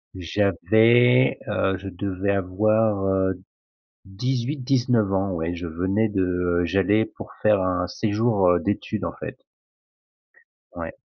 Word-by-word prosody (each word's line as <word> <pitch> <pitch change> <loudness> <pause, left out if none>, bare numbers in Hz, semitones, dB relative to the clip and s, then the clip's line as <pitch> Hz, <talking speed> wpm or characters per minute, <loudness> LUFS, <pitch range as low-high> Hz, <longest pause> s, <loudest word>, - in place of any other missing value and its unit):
j'avais 110 +7 +3
heu, 95 -3 0
je 95 +1 -8
devais 95 +1 -3
avoir, 100 +2 +1
heu, 95 -1 +1 0.7
18-19 125 0 -1
ans, 95 0 0
ouais, 85 0 -3
je 85 0 -6
venais 95 +7 0
de 90 -3 0
j'allais 100 +5 +2
pour - - -9
faire 105 -2 +3
un 90 -1 -1
séjour, 105 +1 0
heu, 90 0 +3
d'études 100 +3 -3
en - - -4
fait. - - -7 1.4
Ouais. - - -6
100 Hz, 120 wpm, -23 LUFS, 90-110 Hz, 1.4 s, j'avais